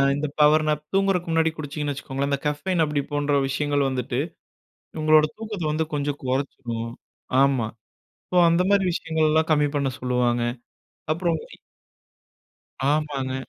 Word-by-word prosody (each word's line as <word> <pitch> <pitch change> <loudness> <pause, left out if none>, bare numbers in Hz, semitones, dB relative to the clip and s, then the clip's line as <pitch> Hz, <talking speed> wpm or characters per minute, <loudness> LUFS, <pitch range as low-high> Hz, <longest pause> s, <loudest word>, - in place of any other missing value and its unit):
இந்த 150 +1 -2
பவர்னாப் 150 0 +4
தூங்குறதுக்கு 195 -3 +1
முன்னாடி 160 0 +3
குடிச்சிங்கன்னு 145 -1 -3
வச்சுக்கோங்களேன். 135 +1 -3
இந்த 140 - +1
கஃபைன் 160 +4 0
அப்டி 150 -1 -1
போன்ற 145 -1 +1
விஷயங்கள் 145 0 +1
வந்துட்டு 125 -1 -2 0.8
உங்களோட 155 0 +6
தூக்கத்தை 215 -6 -5
வந்து 160 +1 0
கொஞ்சம் 145 0 -2
கொறைச்சிரும். 125 -3 -3 0.5
ஆமா 135 -5 +3 0.6
ஸோ 180 - +2
அந்த 170 +2 +3
மாதிரி 200 -1 +4
விஷயங்கள்லாம் 160 -1 +1
கம்மி 150 -1 +4
பண்ண 140 -2 +1
சொல்லுவாங்க. 125 -1 +1 0.7
அப்புறம் 170 0 0 1.6
ஆமாங்க. 145 -4 -1
150 Hz, 120 wpm, -24 LUFS, 135-160 Hz, 1.6 s, உங்களோட